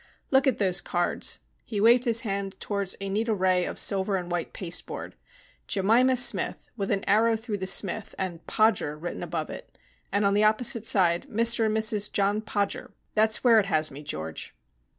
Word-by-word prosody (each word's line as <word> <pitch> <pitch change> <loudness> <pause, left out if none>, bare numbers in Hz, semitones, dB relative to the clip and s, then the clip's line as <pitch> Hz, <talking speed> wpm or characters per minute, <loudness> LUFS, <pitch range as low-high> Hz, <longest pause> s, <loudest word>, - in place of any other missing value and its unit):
"Look 265 0 +3
at 260 - +2
those 190 -3 +1
cards." 175 0 -1 0.3
He 210 - -5
waved 235 +4 +4
his 230 -1 +3
hand 195 -2 -4
towards 200 -2 -2
a 195 - -4
neat 215 +4 -2
array 185 -4 +1
of - - -6
silver 195 0 +2
and 180 -2 -4
white 175 -1 -3
pasteboard. 175 -2 -4 0.5
"'Jemima 230 +7 +3
Smith,' 245 - +1
with 200 -4 -4
an 195 -1 -1
arrow 225 +3 +3
through 220 -2 -5
the 190 - -4
Smith, 195 +2 +1
and 175 -3 -5
'Podger' 215 -9 +1
written 175 +3 -6
above - - -4
it, - - -11 0.3
and 205 0 +1
on 200 - +2
the 205 +1 +2
opposite 225 +1 +1
side 175 -5 +2
'Mr 230 0 +3
and 215 0 0
Mrs 215 -2 +1
John 205 +1 0
Podger.' 205 -2 -3 0.2
That 220 +1 +3
is 220 - +1
where 230 -3 +6
it 200 - -1
has 155 -4 0
me, 140 +2 -10
George." 80 - -7
200 Hz, 190 wpm, -26 LUFS, 185-220 Hz, 0.5 s, where